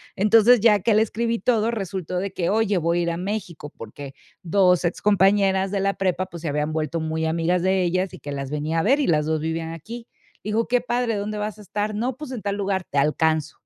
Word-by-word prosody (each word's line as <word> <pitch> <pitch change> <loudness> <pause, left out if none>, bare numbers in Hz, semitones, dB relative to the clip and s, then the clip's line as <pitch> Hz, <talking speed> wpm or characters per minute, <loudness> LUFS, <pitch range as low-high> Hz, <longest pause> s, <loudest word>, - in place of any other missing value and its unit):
Entonces, 220 +3 +5
ya 210 -3 +5
que 210 +3 +2
le 215 - +5
escribí 230 +2 -2
todo, 225 +2 +1
resultó 190 -5 -4
de 195 +1 -2
que 170 -2 -1
oye, 210 -2 +1
voy 170 +1 +1
a - - +1
ir 170 - 0
a 165 - -3
México, 180 -5 -5
porque 135 +5 -9 0.3
2 180 0 +3
ex 170 - -1
compañeras 195 -1 +3
de 200 - -1
la 195 0 +1
prepa, 185 -1 -1
pues, 170 -3 -10
se 165 - -4
habían 150 +2 -1
vuelto 160 +1 -2
muy 160 0 -2
amigas 170 +2 0
de 190 0 +2
ellas 185 +2 -1
y - - -13
que 145 - -7
las 140 -1 -4
venía 150 +2 -1
a - - 0
ver, 275 +7 +3
y - - +1
las 150 -2 +2
2 155 -1 0
vivían 160 +1 -3
aquí. 230 +9 -9 0.4
Digo: 215 +2 -1
"Qué 245 0 +2
padre, 240 -2 -1
¿dónde 210 +1 -4
vas 210 0 -4
a - - -10
estar?". 205 +2 -3
"No, 240 +4 -2
pues, 300 -3 -8
en 240 - -5
tal 200 0 -2
lugar". 195 -2 -1
"Te 140 - -3
alcanzo". 155 +1 +1
190 Hz, 240 wpm, -23 LUFS, 165-210 Hz, 0.4 s, Entonces